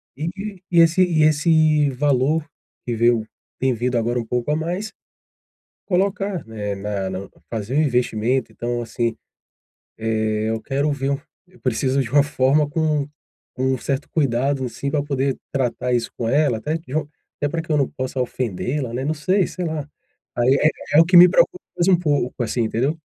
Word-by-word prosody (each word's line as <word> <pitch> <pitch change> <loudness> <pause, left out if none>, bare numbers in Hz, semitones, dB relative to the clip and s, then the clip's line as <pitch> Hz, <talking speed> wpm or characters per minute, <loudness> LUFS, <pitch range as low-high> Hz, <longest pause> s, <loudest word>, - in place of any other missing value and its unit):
e 155 +5 -3
e 195 -2 -7
e 170 - +5
esse 165 +3 +5
e 165 -3 +2
esse 155 -1 +4
valor 145 +3 +1 0.4
que 120 - -1
veio 115 -1 +2 0.3
vem 130 0 +2
vindo 120 +1 -1
agora 120 +1 0
um 120 - -2
pouco 125 +3 -2
a - - +2
mais, 175 +7 -3 0.9
colocar, 195 -1 0
né, 105 -2 -4
na 100 -1 -3
na 95 +1 -6 0.2
fazer 110 +1 -4
o 155 - +5
investimento, 125 -2 0
então, 120 0 -3
assim, 115 0 -2 1.1
eh, 110 0 -1
eu 110 0 -2
quero 140 +6 -1
ver 140 -1 -1 0.4
eu 180 0 -22
preciso 130 +2 +1
de 115 - -7
uma 145 +1 +5
forma 145 +1 +2
com 150 -2 0 0.5
com 130 - -2
um - - -4
certo 140 +3 -3
cuidado, 135 -1 +1
assim, 135 +3 -4
pra 150 - +1
poder 140 -2 -1 0.2
tratar 125 -1 -1
isso 120 -1 0
com 115 - -1
ela, 140 -2 +2
até 150 +8 -2
q 165 +1 -10
de 135 - -4
um 155 - 0 0.3
até 145 - 0
pra 165 +3 -2
que 160 0 -4
eu - - +3
não 140 -2 +2
possa 130 0 -4
ofendê-la, 125 +2 -3
né. 130 +2 -2
Não 155 +3 0
sei, 185 +5 +1
sei 180 - -5
lá. 155 -3 -3 0.5
Aí 120 +2 +4
é 155 - +5 0.3
é - - +10
o - - +7
que 180 - +4
me 175 +1 +10
preocupa 255 - +3 0.2
mais 175 - +2
um 185 -2 +5
pouco, 145 -7 -1
assim, 120 +1 -1
entendeu? 125 +8 0
140 Hz, 190 wpm, -21 LUFS, 120-155 Hz, 1.1 s, é